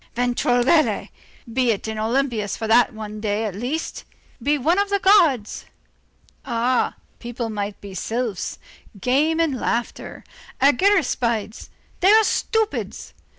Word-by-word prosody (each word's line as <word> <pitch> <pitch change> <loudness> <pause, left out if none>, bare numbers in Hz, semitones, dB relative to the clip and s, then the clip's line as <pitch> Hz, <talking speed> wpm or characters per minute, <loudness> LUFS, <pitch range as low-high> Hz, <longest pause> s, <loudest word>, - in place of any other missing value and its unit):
Ventregoulette! 245 +5 +2 0.4
be 250 -1 +2
in 220 +1 -3
Olympus 225 -2 -1
for 225 - -4
that 235 +2 +4
one 215 -1 -7
day, 210 0 -1
at 210 - -3
least. 250 - -4 0.4
Be 290 +5 +1
one 325 +8 +2
of 405 0 +1
the 400 - +2
gods. 345 - +3 0.8
Ah! 245 -1 0 0.2
people 235 -1 -5
might 205 -1 -4
be 200 -1 -9
sylphs. 225 +1 -3 0.4
Games 290 - +1
and 290 -6 0
Laughter, 235 0 -3 0.4
argiraspides; 255 - +1 0.3
they 375 - +4
are 440 +1 +6
stupids. 440 0 -2
245 Hz, 120 wpm, -22 LUFS, 220-305 Hz, 0.8 s, are